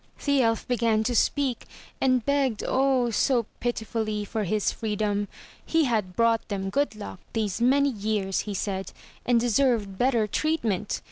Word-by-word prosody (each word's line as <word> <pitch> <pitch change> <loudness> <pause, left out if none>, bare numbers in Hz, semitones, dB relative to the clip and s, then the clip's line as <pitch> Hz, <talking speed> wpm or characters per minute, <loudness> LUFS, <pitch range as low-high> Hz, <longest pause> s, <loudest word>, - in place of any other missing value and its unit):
The 280 -2 +3
elf 225 -2 0
began 230 -3 +2
to 240 +2 -1
speak, 265 0 +1 0.4
and 255 -3 +2
begged, 275 -6 +1
oh! 260 -2 +2
so 235 +1 +2
pitifully, 220 -3 -2
for 215 0 -2
his 210 +3 0
freedom. 210 -1 -1 0.4
He 325 -1 +2
had 215 -8 -1
brought 230 -1 +2
them 195 -2 -3
good 285 -1 0
luck 205 -3 -8
these 215 -1 -1
many 280 +3 +4
years, 205 -3 -1
he 200 - -3
said, 195 0 -3 0.3
and 240 -1 +4
deserved 230 -5 +1
better 245 -3 +3
treatment. 215 - -1
225 Hz, 150 wpm, -26 LUFS, 210-255 Hz, 0.4 s, many